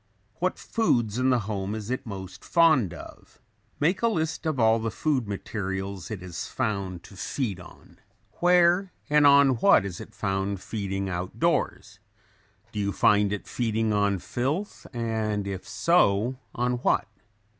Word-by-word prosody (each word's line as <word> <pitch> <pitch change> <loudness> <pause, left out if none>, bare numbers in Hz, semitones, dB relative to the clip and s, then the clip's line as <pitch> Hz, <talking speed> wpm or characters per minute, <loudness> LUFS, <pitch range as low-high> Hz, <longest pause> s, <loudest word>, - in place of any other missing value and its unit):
What - - 0
foods 120 - 0
in 130 +1 +3
the 125 -2 +3
home 100 -1 -3
is 110 +1 -5
it 130 - -3
most 95 -2 -8
fond 155 - +4
of? 85 - -12 0.4
Make 170 +6 +1
a 235 - +3
list 160 -6 -1
of 155 -5 -1
all 110 0 +4
the 115 0 -2
food 130 -1 -1
materials 95 -2 -4
it 100 -4 -6
is 90 -2 -6
found 100 -7 -3
to 100 - -14
feed 100 -1 -3
on. 90 - -15 0.4
Where 180 +1 +4 0.2
and 150 -1 +6
on 140 -3 +6
what 100 - +5
is 90 -3 -6
it - - -12
found 95 0 -1
feeding 100 -1 -3
out 90 0 -4
doors? 95 0 0 0.7
Do 105 - -4
you 100 -1 0
find 105 0 +3
it 105 - -4
feeding 110 -2 0
on 100 -1 +2
filth 140 - -3
and 110 -3 -2
if 95 -1 -5
so, 115 - +2 0.2
on 125 +1 0
what? 120 - +1
110 Hz, 155 wpm, -26 LUFS, 100-130 Hz, 0.7 s, and